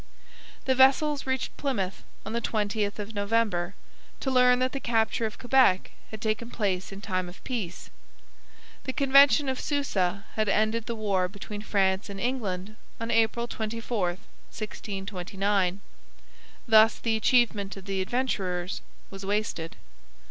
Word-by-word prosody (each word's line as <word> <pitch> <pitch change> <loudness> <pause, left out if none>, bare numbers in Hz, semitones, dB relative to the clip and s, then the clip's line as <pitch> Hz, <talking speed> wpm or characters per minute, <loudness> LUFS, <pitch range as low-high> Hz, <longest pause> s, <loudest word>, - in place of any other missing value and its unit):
The 265 - +3
vessels 275 +2 +4
reached 260 -1 -2
Plymouth 200 -10 -2 0.2
on 215 - -5
the 235 - 0
20th 210 -2 -1
of 210 +1 -6
November, 200 -3 0 0.5
to 265 - -1
learn 250 -1 +5
that 255 +1 +1
the 275 - -3
capture 225 -2 +1
of 215 - -9
Quebec 245 -7 +3 0.2
had 220 - -7
taken 220 +2 -2
place 195 -6 -1
in 195 0 -8
time 185 -3 -2
of 175 - -14
peace. 215 -9 -5 0.9
The 260 - -2
Convention 275 -1 +6
of 260 -1 -1
Susa 200 -10 -1
had 215 -2 0
ended 215 +2 +1
the 235 - -2
war 200 -4 +1
between 205 +1 -7
France 195 -1 +1
and 200 -1 -6
England 215 -4 -3 0.2
on 230 0 -3
April 230 +1 +2
24, 225 -3 -2 0.4
1629; 195 -2 -2 0.9
thus 220 0 +6
the 225 -1 0
achievement 220 -4 +2
of 190 - -10
the 195 -1 -1
Adventurers 185 -6 -2 0.3
was 195 0 -8
wasted. 200 -5 -2
215 Hz, 140 wpm, -27 LUFS, 195-240 Hz, 0.9 s, Convention